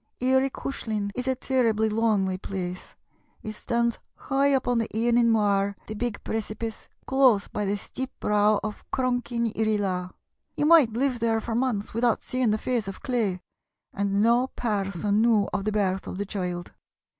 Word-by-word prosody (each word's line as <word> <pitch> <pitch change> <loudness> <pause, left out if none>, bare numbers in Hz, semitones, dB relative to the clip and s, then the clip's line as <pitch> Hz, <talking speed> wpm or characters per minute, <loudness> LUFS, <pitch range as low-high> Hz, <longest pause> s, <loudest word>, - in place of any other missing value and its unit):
Eary 260 +2 +3
Cushlin 215 -7 -4
is 250 +3 -4
a 260 - +2
terribly 230 -4 +1
lonely 210 -4 +1
place; 185 -2 -5 0.5
it 215 - -5
stands 235 +2 -1 0.2
high 275 +1 +1
up 265 -2 +1
on 245 -1 +2
the 225 - -1
Eanin 235 +1 +2
Mooar, 200 -2 +2
the 215 - -6
big 225 0 -3
precipice, 220 0 -4 0.2
close 260 -7 +4
by 210 - -3
the 200 +1 0
steep 260 +5 -6
brow 210 0 +3
of 215 -1 -5
Cronk 255 -1 -1
yn 235 -1 0
Irree 215 -1 +1
Laa. 180 -3 -2 0.5
You 295 - +1
might 310 -7 +6
live 255 +1 0
there 225 -1 +1
for 225 +1 -4
months 235 -4 -1
without 230 0 +1
seeing 255 -2 0
the 215 - +2
face 235 -2 -1
of 195 - -7
clay, 220 -8 -1 0.5
and 200 +1 +1
no 240 +3 +4
person 205 -3 -1
knew 225 -3 +3
of 195 - -1
the 215 - +1
birth 195 -3 0
of - - -5
the 205 - -2
child. 180 -3 -4
220 Hz, 175 wpm, -26 LUFS, 205-245 Hz, 0.5 s, might